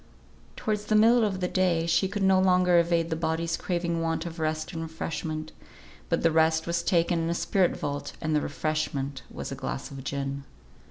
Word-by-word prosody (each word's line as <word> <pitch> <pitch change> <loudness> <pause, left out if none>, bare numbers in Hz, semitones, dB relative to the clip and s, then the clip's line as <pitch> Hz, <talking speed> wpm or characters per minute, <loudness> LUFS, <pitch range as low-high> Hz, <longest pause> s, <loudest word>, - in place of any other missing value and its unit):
Towards 210 -1 -2
the 215 - +1
middle 230 +2 +6
of 195 -3 -1
the 180 - +1
day 180 -3 +1
she 170 +3 +2
could 195 +1 -3
no 190 -1 +5
longer 180 -2 +4
evade 170 0 +1
the - - +1
body's 165 0 -1
craving 170 -2 -2
want 165 0 -1
of 170 0 -7
rest 155 0 -2
and 165 - -4
refreshment; 160 -1 -4 0.6
but - - 0
the 165 - +4
rest 160 0 +3
was 170 0 0
taken 170 0 +2
in 165 0 -1
a 170 - 0
spirit 185 0 +1
vault, 145 0 -4
and 155 -1 -1
the 150 - +2
refreshment 140 -2 -2
was - - -6
a - - -3
glass 65 - -5
of 135 -1 -8
gin. 140 0 -3
165 Hz, 200 wpm, -27 LUFS, 155-180 Hz, 0.6 s, middle